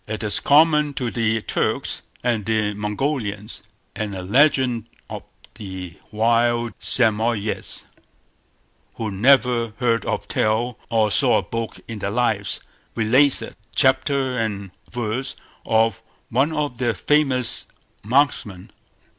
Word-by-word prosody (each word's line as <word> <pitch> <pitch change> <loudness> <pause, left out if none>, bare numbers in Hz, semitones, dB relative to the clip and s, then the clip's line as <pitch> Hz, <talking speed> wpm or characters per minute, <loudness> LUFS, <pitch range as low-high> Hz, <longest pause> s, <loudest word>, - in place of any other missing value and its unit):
It 110 0 -4
is 105 -1 +1
common 150 -1 +4
to 125 -3 -2
the 110 -2 0
Turks - - -1 0.2
and 120 -4 0 0.3
Mongolians; 105 0 -3 0.3
and 105 -2 -4
a 95 - -5
legend 125 0 +2 0.2
of - - -5 0.3
the 95 -4 -8
wild 120 +2 +1
Samoyeds, 110 -2 +1 1.1
who 110 -2 -3
never 120 +1 +3
heard 115 -4 +1
of - - -2
Tell 110 +3 0
or 110 -2 +2
saw - - +4
a - - -1
book 115 -1 -5
in 115 -2 -6
their 100 - -2
lives, 110 -3 0 0.3
relates 130 +5 +4
it, - - -9 0.2
chapter 130 -1 +2
and 100 -4 -3 0.2
verse, 120 +3 -3 0.3
of 110 -2 +2 0.3
one 135 +6 +2
of 145 -5 -2
their 120 -3 0
famous 135 0 +1 0.3
marksmen. 110 -6 0
115 Hz, 120 wpm, -22 LUFS, 105-130 Hz, 1.1 s, common